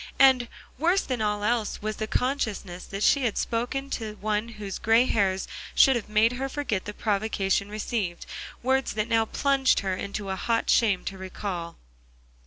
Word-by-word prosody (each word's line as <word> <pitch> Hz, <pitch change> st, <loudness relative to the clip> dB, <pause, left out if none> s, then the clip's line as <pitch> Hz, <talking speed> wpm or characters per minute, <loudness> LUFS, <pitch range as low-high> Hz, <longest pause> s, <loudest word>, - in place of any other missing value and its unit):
and, 260 Hz, -3 st, +6 dB, 0.3 s
worse 350 Hz, +6 st, +3 dB
than 255 Hz, -4 st, -3 dB
all 210 Hz, -1 st, 0 dB
else, 225 Hz, 0 st, 0 dB
was 215 Hz, 0 st, -3 dB
the 215 Hz, -, -3 dB
consciousness 220 Hz, -9 st, -2 dB
that 200 Hz, +1 st, -4 dB
she 280 Hz, -2 st, +4 dB
had 230 Hz, -4 st, 0 dB
spoken 245 Hz, +4 st, -1 dB
to 220 Hz, -5 st, -4 dB
one 215 Hz, +1 st, -1 dB
whose 210 Hz, -4 st, -6 dB
gray 225 Hz, +3 st, +4 dB
hairs 195 Hz, -5 st, +1 dB, 0.3 s
should 270 Hz, -2 st, +6 dB
have 225 Hz, -3 st, -3 dB
made 215 Hz, +2 st, +4 dB
her 265 Hz, +2 st, -3 dB
forget 260 Hz, -9 st, -2 dB
the 210 Hz, -, -4 dB
provocation 200 Hz, -2 st, 0 dB
received, 210 Hz, -4 st, -3 dB, 0.4 s
words 265 Hz, +1 st, +1 dB
that 215 Hz, 0 st, -1 dB
now 225 Hz, -1 st, +3 dB
plunged 275 Hz, +2 st, +2 dB
her 190 Hz, -2 st, -1 dB
into 200 Hz, +1 st, -5 dB
a -, -, -1 dB
hot 230 Hz, +4 st, 0 dB
shame 205 Hz, -6 st, +3 dB
to 195 Hz, -1 st, -5 dB
recall. 185 Hz, -2 st, -5 dB
215 Hz, 175 wpm, -26 LUFS, 200-245 Hz, 0.4 s, and